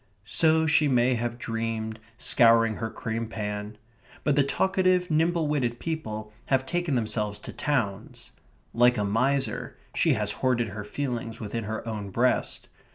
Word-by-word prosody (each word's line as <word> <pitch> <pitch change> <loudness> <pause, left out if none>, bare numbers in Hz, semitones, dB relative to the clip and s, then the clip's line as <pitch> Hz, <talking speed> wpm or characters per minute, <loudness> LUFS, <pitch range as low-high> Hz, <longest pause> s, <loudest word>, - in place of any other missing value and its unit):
So 160 0 +3
she 150 -1 +4
may 125 -1 +3
have 120 0 -2
dreamed, 115 -1 -3 0.2
scouring 115 -3 +4
her 115 0 -3
cream 115 +1 -4
pan. 105 -1 -5 0.5
But 150 - +2
the 145 - +5
talkative, 185 +3 +2
nimble 165 +1 +2
witted 130 -6 0
people 110 -10 -4
have 130 -1 +2
taken 175 -2 -1
themselves 105 -3 -1
to - - -9
towns. 120 -10 -2 0.4
Like 120 +1 +4
a 105 - +1
miser, 125 +3 0 0.2
she - - +3
has - - 0
hoarded 120 -3 0
her 105 +1 -6
feelings 120 -1 -4
within 110 0 -4
her 110 +2 -4
own 105 -3 -4
breast. 120 +6 0
120 Hz, 150 wpm, -27 LUFS, 110-145 Hz, 0.5 s, the